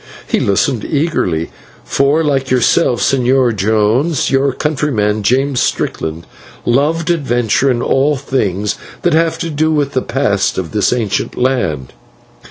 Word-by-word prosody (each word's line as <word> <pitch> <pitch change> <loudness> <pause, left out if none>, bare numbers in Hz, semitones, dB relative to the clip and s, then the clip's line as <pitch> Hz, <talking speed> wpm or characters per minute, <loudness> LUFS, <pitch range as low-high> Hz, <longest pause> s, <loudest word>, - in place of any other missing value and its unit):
He - - 0
listened 105 +4 0
eagerly, 140 - -1 0.3
for, 145 +4 +1
like 135 -3 0
yourself, 125 +1 +2
Señor 130 -2 +2
Jones, 110 - +1
your 135 +1 +2
countryman, 130 -8 -1
James 130 +4 +1
Strickland, 80 +1 -2 0.4
loved 150 +7 +1
adventure 130 -5 +1
and 125 -1 0
all 140 +3 +2
things 105 -7 -2 0.3
that 175 - +2
have 165 0 +2
to 165 - -4
do 155 +2 +1
with 145 -3 0
the 130 - 0
past 110 -8 0
of 90 -3 -3
this 105 -2 +1
ancient 110 -5 -2
land. 120 - -1
130 Hz, 135 wpm, -15 LUFS, 105-145 Hz, 0.4 s, yourself